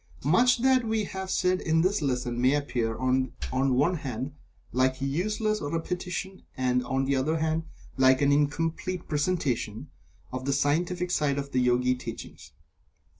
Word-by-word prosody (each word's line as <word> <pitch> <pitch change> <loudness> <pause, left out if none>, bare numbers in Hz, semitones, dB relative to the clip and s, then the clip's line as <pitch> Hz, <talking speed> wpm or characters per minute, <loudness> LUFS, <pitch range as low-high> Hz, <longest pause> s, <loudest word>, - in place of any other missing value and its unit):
Much 240 - +4
that 260 -1 +4
we 220 -1 0
have 190 -1 -5
said 185 0 +1
in 160 0 +2
this 185 +1 +1
lesson 125 -3 -1
may 130 +3 +4
appear, 120 -6 -1
on 130 0 0 0.2
the 130 - -1
one 145 +8 +2
hand, 130 -1 -5 0.4
like 130 +1 +1
useless 210 +10 -1
repetition, 180 +5 -4 0.2
and, 125 -1 +1
on 135 0 0
the 140 +1 +1
other 150 +5 +1
hand, 160 0 -1 0.3
like 130 0 +5
an 140 0 +3
incomplete 165 +5 0
presentation 145 - -1 0.4
of 130 0 -4
the 140 - +1
scientific 175 +6 0
side 145 -5 +1
of 140 0 -4
the 130 - +1
Yogi 125 +1 +3
teachings. 125 - -8
145 Hz, 155 wpm, -27 LUFS, 130-180 Hz, 0.4 s, like